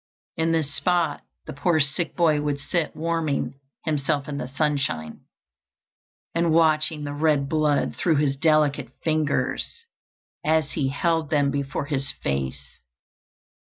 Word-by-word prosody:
In 165 0 +1
this 155 -3 0
spot 175 -2 +1 0.2
the - - -6
poor 160 +3 +2
sick 145 +4 0
boy 155 -4 +3
would 145 -1 -1
sit 155 +2 -1
warming 160 -4 -1 0.3
himself 145 -2 0
in 145 -1 -4
the 125 - -4
sunshine, 135 - -2 1.1
and 170 0 +2
watching 155 -1 +3
the 145 0 -4
red 145 -2 +2
blood 150 -1 +1
through 165 -3 +2
his 145 -1 +2
delicate 155 -1 +2
fingers 155 - -1 0.6
as 155 -1 +2
he 140 - 0
held 160 +2 0
them 145 -3 +2
before 140 0 -2
his 140 -2 -2
face. 70 -2 -3
150 Hz, 130 wpm, -24 LUFS, 140-160 Hz, 1.1 s, boy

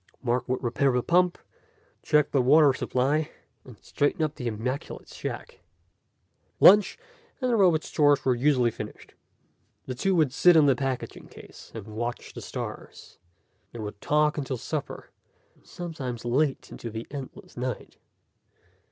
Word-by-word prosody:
Mark 125 0 -1
would 130 +1 -1
repair 125 +3 +1
the 125 -1 +1
pump, 180 +1 +2 0.6
check 150 -1 +2
the 135 - +3
water 145 +2 +5
supply, 140 +5 0 0.3
and 125 -4 -14
straighten 145 +2 0
up 155 -1 -1
the 125 -6 -5
immaculate 120 +5 -4
shack. - - -7 1.0
Lunch, 205 +1 +7 0.4
and 255 -2 0
the - - +3
robot's 180 -7 +3
chores 145 -2 +3
were 130 - +4
usually 125 -1 +2
finished. - - -9 0.7
The 130 - -4
two 190 +10 0
would 155 -6 +2
sit 175 +3 +6
on 155 - +6
the 135 -2 +4
packing 135 -1 -4
case - - -14
and - - -7
watch 115 +2 -5
the - - -8
stars. - - -8 0.5
They 120 - -8
would 105 -1 -7
talk 150 0 +2
until 135 -2 -3
supper, - - -5 0.4
and - - -29
sometimes 135 -9 -6
late 135 +3 0
into 115 - -7
the 110 +1 -6
endless 150 +7 -9
night. 125 0 -5
135 Hz, 150 wpm, -26 LUFS, 125-155 Hz, 1.0 s, Lunch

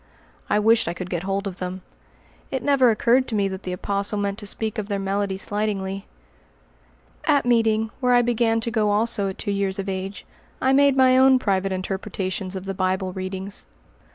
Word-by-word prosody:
I - - +3
wished 225 +2 +3
I 170 - -2
could 185 0 -6
get 175 -2 -1
hold 195 +2 -2
of 190 -2 -5
them. 185 0 -5 0.7
It 265 -3 -3
never 275 -3 +4
occurred 240 +3 +3
to 225 - -3
me 200 -1 +2
that 190 0 -6
the 185 - -5
Apostle 200 +3 -2
meant 200 0 -2
to 205 - -5
speak 220 +1 -1
of 205 - -4
their 200 -2 -1
melody 195 0 -1
slightingly. 195 -1 -3 1.2
At 285 -3 +3
meeting, 225 -2 +2
where 250 -2 +3
I 245 - +5
began 230 -1 +2
to 235 - -3
go 215 -3 +1
also 210 0 +1
at 190 - -7
two 205 - -2
years 200 -1 -1
of 195 0 -4
age, 195 +1 -4 0.3
I 265 +1 +2
made 280 0 +4
my 260 -1 +6
own 265 0 +6
private 195 -5 0
interpretations 190 0 -3
of 190 0 -5
the 195 - -3
Bible 185 0 -1
readings. 190 +1 -4
200 Hz, 195 wpm, -23 LUFS, 190-230 Hz, 1.2 s, my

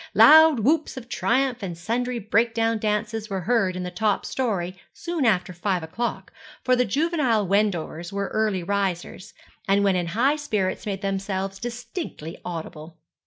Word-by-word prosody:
Loud 315 -4 +8
whoops 300 +5 +1
of 245 -2 -8
triumph 250 0 0
and 175 -4 -5
sundry 240 +7 -2
breakdown 225 +1 +1
dances 215 +1 -2
were 195 -2 -2
heard 205 -3 +1
in 180 - -4
the 180 - -5
top 205 +3 0
story 190 -8 -2 0.2
soon 340 -7 -2
after 185 -3 +1
five 180 0 -1
o'clock, 225 +10 -4 0.3
for 255 0 +3
the 250 0 +2
juvenile 270 - +1
Wendovers 175 -4 0
were 200 0 -2
early 215 -4 0
risers, 195 0 -3 0.3
and 200 +1 +3
when 195 -2 +3
in 175 -1 -1
high 255 - +2
spirits 215 -11 -2
made 200 -1 -3
themselves 195 0 -2
distinctly 240 - -6
audible. 160 -1 -7
210 Hz, 155 wpm, -24 LUFS, 185-240 Hz, 0.3 s, Loud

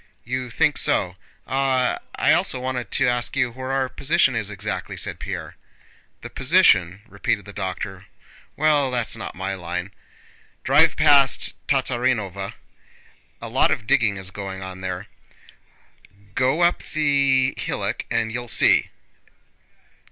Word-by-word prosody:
"You 125 +1 -4
think 140 +4 +1
so?... 90 -2 +1 0.3
Ah, 130 -1 +1 0.2
I - - +3
also 130 - +1
wanted 125 -4 -3
to 135 - +2
ask 120 +1 -1
you 125 -3 +1
where 130 +2 -6
our 135 -1 0
position 135 0 +1
is 110 -2 -2
exactly?" 100 -3 -5
said - - -4
Pierre. - - -6 0.6
"The - - -8
position?" 105 - +3
repeated 100 -1 -2
the 100 - -10
doctor. 95 -1 -5 0.5
"Well, 150 -3 +2
that's 120 -3 -1
not - - -7
my 95 +2 -3
line. 90 +1 -5 0.7
Drive - - +4
past 140 -2 +4
Tatárinova, 120 -7 -1 0.9
a - - -5
lot - - +3
of 110 - -1
digging 115 -6 +2
is 95 0 -7
going 95 -1 -6
on 95 0 -8
there. 95 +1 -4 1.3
Go 130 - +1
up 175 0 +3
the 140 -4 +2
hillock - - -3
and 110 -1 0
you'll 120 +1 -5
see." - - +4
120 Hz, 135 wpm, -22 LUFS, 95-135 Hz, 1.3 s, Drive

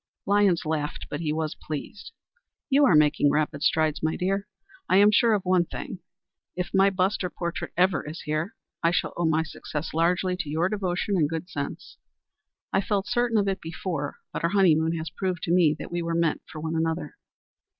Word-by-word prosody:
'" - - -65
Lyons 200 -4 +3
laughed, 155 -1 -2
but 145 - -3
he 155 -2 -1
was 155 0 -2
pleased. 155 +7 -7 0.6
"You 285 +2 +6
are 190 - +5
making 150 -1 +4
rapid 150 0 0
strides, 155 0 +2
my 160 0 0
dear. 195 +2 -1 0.4
I 185 - +5
am 205 +1 +7
sure 230 +1 +4
of 200 - -2
one 180 -1 +3
thing 220 - -7 0.6
if 180 -1 -3
my 195 0 +5
bust 190 +1 0
or 180 - -1
portrait 170 -1 -4
ever 180 -4 +3
is 160 - -7
here, 155 +6 -2 0.3
I 165 - +4
shall 175 - 0
owe 175 - 0
my 160 0 +2
success 155 -1 -6
largely 180 +3 +1
to 175 -5 -4
your 165 +4 +1
devotion 195 -1 -1
and 150 -4 +2
good 165 +3 -5
sense. 140 -1 -6 0.8
I - - +3
felt 200 -1 -1
certain 240 -1 +1
of 200 -1 +2
it 195 0 -1
before, 160 -3 -4 0.2
but - - -4
our 170 - +3
honeymoon 165 -4 +3
has 160 -1 -4
proved 180 0 -3
to - - -1
me 165 -4 +4
that - - -8
we 175 0 -1
were 165 0 -2
meant 165 -2 +1
for 155 - -7
one 160 +1 -3
another." 165 - -2
170 Hz, 200 wpm, -26 LUFS, 160-195 Hz, 0.8 s, am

